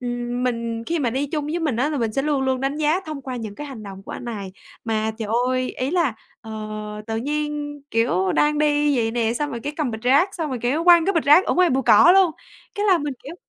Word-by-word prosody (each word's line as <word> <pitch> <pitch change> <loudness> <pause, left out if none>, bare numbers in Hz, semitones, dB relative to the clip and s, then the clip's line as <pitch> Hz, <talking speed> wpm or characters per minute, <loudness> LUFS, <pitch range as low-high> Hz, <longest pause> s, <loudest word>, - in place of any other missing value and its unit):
ừm, 245 0 -3
mình 230 -2 -2
khi 335 0 -1
mà 245 -5 0
đi 270 +4 -1
chung 295 0 -3
với 330 +3 -2
mình 300 -8 -1
á 280 +6 +1
là 295 - -2
mình 225 -2 -1
sẽ 270 - 0
luôn 290 -3 0
luôn 260 -1 0
đánh 275 +2 -1
giá 310 +4 +1
thông 300 -3 -6
qua 255 -2 -5
những 215 -3 -6
cái 295 - -7
hành 250 -6 -9
động 195 -1 -9
của - - -9
anh - - -7
này. 205 -5 -6 0.3
Mà 220 -1 -1
trời 215 -2 -4 0.2
ơi! 255 0 -1
Ý 260 +3 -3
là, 335 -9 +1 0.3
ờ, 225 - -11 0.6
tự 225 0 -3
nhiên, 295 +2 -3
kiểu, 190 -5 +1
đang 300 0 +2
đi 295 -2 +2
vậy 225 -1 +1
nè, 230 -1 0
xong 295 +3 -2
rồi 235 -3 -5
cái 290 +4 -4
cầm 295 -6 -1
bịch 220 0 -7
rác, 285 +10 +3
xong 320 -4 -3
rồi, 255 -3 -3
kiểu, 290 +8 0
quăng 345 -2 +7
cái 395 - +2
bịch 330 - 0
rác 300 +7 +6
ở - - 0
ngoài 360 -2 +4
bụi 265 +1 +1
cỏ 270 +12 +7
luôn. 380 -3 +5 0.4
Cái 415 0 -1
là 370 -4 +5
mình, 290 -2 -3
kiểu, 305 +5 -8
270 Hz, 265 wpm, -22 LUFS, 235-300 Hz, 0.6 s, quăng